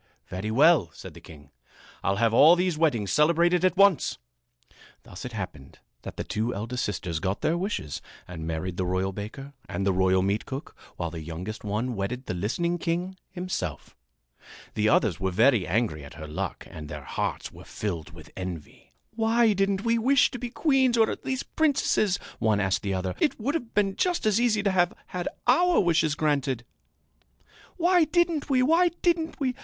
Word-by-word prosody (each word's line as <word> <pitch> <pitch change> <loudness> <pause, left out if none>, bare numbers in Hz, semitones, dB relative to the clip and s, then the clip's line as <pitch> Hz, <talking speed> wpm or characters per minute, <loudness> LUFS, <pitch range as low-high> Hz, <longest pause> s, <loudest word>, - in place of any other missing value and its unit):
"Very 95 +4 -4
well," 140 - +4
said - - -10
the - - -13
king. 75 -3 -14 0.5
"I'll 95 - +1
have 115 +2 +2
all 155 +8 +8
these 180 -1 0
weddings 135 -11 +1
celebrated 170 +3 +3
at 185 0 +2
once." 200 -4 +4 0.9
Thus 90 - -10
it 125 - -5
happened 90 -10 -7 0.2
that - - -9
the - - -2
two 115 +3 -2
eldest 115 +5 -3
sisters 85 -5 -3
got 95 +3 -2
their 160 - +1
wishes 175 - -3 0.3
and 80 -2 -7
married 80 +2 -3
the 95 - -1
royal 95 +1 0
baker 115 +8 -8 0.2
and 100 - -2
the 100 - +2
royal 95 0 +3
meatcook, 110 - -3 0.2
while 85 -2 -3
the 80 -1 -6
youngest 85 +7 -6
one 110 +4 -2
wedded 120 +6 -4
the - - -3
listening 170 - -1
king 175 +3 -2
himself. 180 - -5 0.8
The 105 0 +1
others 105 -5 +2
were 95 0 0
very 110 - +3
angry 95 -6 0
at 70 - -11
her 80 +1 -8
luck 75 - -5
and 75 -2 -9
their 75 -2 -7
hearts - - -3
were - - -13
filled 95 -4 -5
with 85 -3 -14
envy. 90 -5 -8 0.2
"Why 225 0 +3
didn't 195 +1 0
we 230 0 +2
wish 265 +3 +4
to 250 - -6
be 245 0 -4
queens 265 -3 +2
or 225 -1 +4
at - - -7
least 260 0 -4
princesses?" 270 - +2 0.2
one 110 -2 +2
asked 95 -2 +1
the 100 -2 -2
other. 95 0 -2
"It 295 - +1
would 265 +7 -1
have 240 -8 -4
been 195 -2 +2
just 360 -7 0
as 215 +1 +3
easy 220 -4 +2
to 200 - +2
have 175 -1 +2 0.2
had 180 -1 -3 0.2
our 345 +8 +4
wishes 165 -4 +2
granted!" 140 -6 0 1.1
"Why 350 -1 +4
didn't 330 -2 +1
we! 255 -2 +3
Why 335 +6 +4
didn't 330 -2 +1
we! 260 -3 0
135 Hz, 185 wpm, -26 LUFS, -, 1.1 s, all